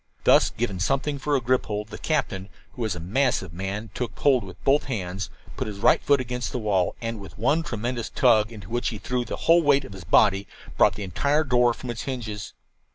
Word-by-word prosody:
Thus - - +5
given 105 -6 -3
something 140 +7 0
for 145 +1 0
a - - +3
grip 125 +1 +1
hold, 105 0 -3
the - - -8
captain, 105 -11 -1 0.2
who - - -9
was 110 -5 -1
a - - -6
massive 95 - 0
man, 95 +4 -4
took 125 - -4
hold 130 -6 +3
with 95 -2 -10
both 140 +2 +3
hands, 95 -6 -4 0.3
put - - -2
his 105 -2 -6
right - - +4
foot 140 -1 +3
against 125 0 -3
the - - -2
wall, 100 -6 0
and, 115 -1 -3
with 100 - -11
one 140 +10 +2
tremendous 120 -3 -3
tug, 115 -5 +3
into 110 -1 -11
which 120 +1 -1
he 110 - -6
threw 125 +4 -2
the - - -4
whole 170 +1 +6
weight 140 -3 +3
of 100 - -10
his 95 -3 -9
body, 100 +4 +3 0.3
brought 100 -2 +4
the 105 - -5
entire 140 - +1
door 125 -4 +3
from 125 - -6
its 115 - -5
hinges. 115 -6 -5
115 Hz, 225 wpm, -25 LUFS, 100-130 Hz, 0.3 s, whole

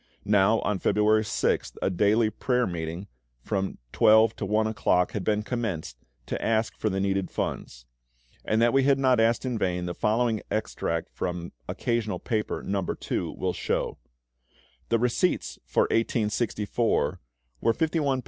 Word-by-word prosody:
Now 105 +2 +4
on 105 -2 -1
February 105 +2 +3
6th 105 - -1
a - - 0
daily 105 +4 +3
prayer 125 +3 0
meeting, 85 0 -4 0.4
from 95 -2 -2
12 110 +1 +5
to - - -3
1 110 +2 +2
o'clock, 90 -4 +1
had 105 - -3
been 105 +1 +1
commenced, 105 - -3 0.3
to - - -4
ask 110 0 +1
for 110 - -1
the 95 -1 -1
needed 95 -1 0
funds. - - -4 0.6
And 110 - +1
that 120 - +3
we 135 - +5
had 135 0 +4
not 130 -3 +3
asked 115 +2 +2
in 125 -3 -2
vain, 90 -2 -1
the 90 - -3
following 110 +3 +1
extract 85 -6 -2
from 90 -1 -4 0.2
"Occasional 110 -5 -1
Paper, 110 +2 -2
No. 100 0 -1 0.3
II." - - -1
will - - -1
show: - - -2 0.9
"The 115 - +3
receipts 125 - 0
for - - +3
1864 115 0 0 0.4
were - - +3
£51:14s. 150 -1 0
110 Hz, 150 wpm, -27 LUFS, 95-115 Hz, 0.9 s, 12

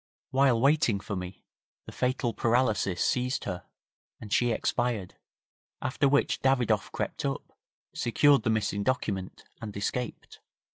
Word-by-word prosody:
While 130 -3 +4
waiting 135 -5 +3
for 100 - -5
me 90 0 -7 0.4
the - - -9
fatal 125 -2 -1
paralysis 110 -6 +1
seized 125 +1 0
her, 90 -3 -5 0.5
and 105 -2 -6
she 120 - +3
expired, 110 -3 -1 0.7
after 140 +2 +1
which 140 +1 +2
Davidoff 120 -6 +2
crept - - -3
up, - - -4 0.4
secured 140 +3 +4
the 110 - -1
missing 110 -2 0
document 100 -6 -2 0.2
and 105 -3 -6
escaped. 120 +4 -4
115 Hz, 130 wpm, -28 LUFS, 100-130 Hz, 0.7 s, While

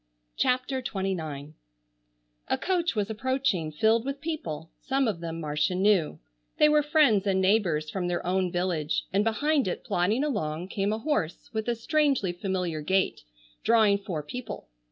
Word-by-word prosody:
CHAPTER 255 +1 0
XXIX 160 - -4 0.9
A - - +1
coach 350 -5 0
was 210 0 -1
approaching 240 -8 0
filled 220 +9 +2
with 275 +1 -4
people, 175 - -5
some 270 -1 0
of 200 -6 -1
them 165 -1 -5
Marcia 150 +3 0
knew; 190 -4 +2 0.4
they 300 - +6
were 300 0 +4
friends 285 - +3
and 190 -1 +2
neighbors 185 -6 +2
from 185 -2 -2
their 175 0 -2
own 185 0 +1
village, 170 -4 -1
and 200 +2 +3
behind 280 +3 +1
it 180 - -3
plodding 205 +10 +1
along 170 - -2
came 200 0 -1
a 215 - 0
horse 225 - -2
with 220 0 -2
a 240 - +1
strangely 275 - +1
familiar 180 -3 -2
gait 190 +5 +1 0.4
drawing 220 -3 +4
four 175 -6 -4
people. 235 - -7
200 Hz, 155 wpm, -27 LUFS, 175-255 Hz, 0.9 s, they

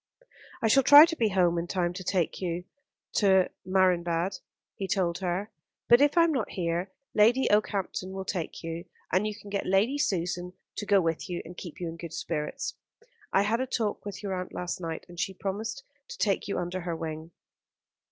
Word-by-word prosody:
"I - - +4
shall 270 +5 +6
try 290 +3 +10
to 330 0 -3
be 225 -7 +2
home 175 -3 +2
in 170 - -4
time 175 -1 0
to 185 +1 -6
take 180 -2 -1
you 175 -1 -2 0.5
to 190 -3 +4
Marienbad," 180 -1 +1 0.4
he 195 - -4
told 180 -2 0
her. 190 +3 -2 0.4
"But 240 +2 +7
if 290 +3 +4
I 335 - +8
am 335 - +3
not 250 -7 -1
here, 175 +1 -2 0.2
Lady 230 +5 +4
Okehampton 195 -2 0
will 190 0 -5
take 175 -4 -4
you, 165 +1 -5 0.3
and 190 +4 +2
you 210 - -4
can 200 0 -12
get 200 - -2
Lady 210 +10 +2
Susan 180 - -1 0.2
to 210 - -4
go 200 -1 +5
with 165 +1 -1
you 175 - -3
and 175 +2 -10
keep 175 -3 -9
you 175 - -3
in 165 0 -6
good 165 -1 -8
spirits. 155 -2 -3 0.6
I 195 - +4
had 220 +3 +1
a 260 - -1
talk 225 -4 -2
with 205 0 -7
your 195 -2 -2
aunt 180 0 -5
last 180 0 -4
night, 165 -1 -5
and 175 -1 -11
she 190 +3 -2
promised 220 +8 -4 0.2
to - - -9
take 200 -2 0
you 200 - -2
under 175 +1 -3
her 170 -1 -3
wing." 160 0 -5
185 Hz, 200 wpm, -28 LUFS, 175-210 Hz, 0.6 s, try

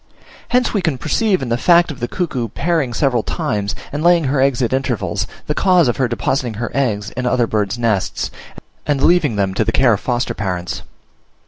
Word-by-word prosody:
Hence 250 0 +1
we 205 - +1
can 160 -7 0
perceive 190 - +1
in 125 - -4
the 120 +1 0
fact 170 +1 +4
of 145 - -9
the 120 - -2
cuckoo 130 -9 -2
pairing 145 - -1
several 125 -1 +1
times, 100 -2 -2 0.2
and 145 +2 -3
laying 170 -1 +5
her 135 -1 +1
eggs 135 -2 +2
at 120 - 0
intervals, 105 -7 -1 0.2
the 150 - -1
cause 180 -2 +3
of 120 - 0
her 130 - +2
depositing 120 0 -1
her 115 +3 -4
eggs 105 -7 -1
in 125 0 -3
other 125 -1 +2
birds' 105 -1 -1
nests, 110 -5 -1 0.6
and 145 -2 +1
leaving 165 -9 +3
them 100 -2 0
to 105 - +1
the - - 0
care 130 -3 +4
of 100 - -1
foster 120 0 -1
parents. 90 -5 -3
125 Hz, 205 wpm, -18 LUFS, 110-150 Hz, 0.6 s, laying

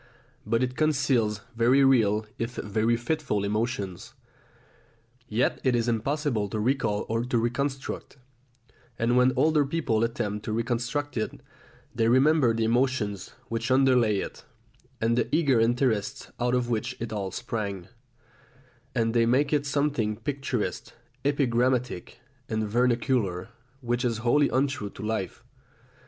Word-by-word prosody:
But 115 +3 +2
it 125 0 -2
conceals 130 -9 +1
very 125 +4 +4
real 110 -5 +3
if 115 +1 -3
very 110 +3 0
fitful 120 -4 -1
emotions; 105 -3 -3 1.1
yet 115 +4 0
it 130 -2 +3
is 120 0 0
impossible 120 -1 0
to 110 - -3
recall 110 -3 0
or 115 +1 -1
to 125 0 0
reconstruct; 135 +4 -2 0.8
and 115 +2 +1
when 125 +1 +5
older 150 +2 +3
people 135 -7 0
attempt 105 -3 -2
to 110 - -2
reconstruct 120 +4 -2
it, 110 - -3 0.5
they 115 0 +1
remember 130 +1 +4
the 115 0 0
emotions 115 -5 0
which 115 0 -3
underlay 130 -5 +4
it, - - -5 0.6
and 115 +1 +2
the 120 - +1
eager 140 -7 +3
interests 115 -2 0
out 125 +1 +1
of 125 -1 0
which 115 -3 -2
it 115 -1 -4
all 100 -2 -2
sprang; 100 -4 -4 1.1
and 115 -2 +1
they 115 -1 +3
make 140 +5 +2
it 145 -1 +1
something 140 -7 0
picturesque, 135 -2 -3 0.3
epigrammatic, 125 -6 0 0.3
and 110 -1 -1
vernacular 115 -4 +1 0.3
which 120 0 -1
is 120 -3 0
wholly 145 +4 +4
untrue 130 -6 0
to - - -10
life. 110 +1 -3
120 Hz, 135 wpm, -27 LUFS, 110-130 Hz, 1.1 s, when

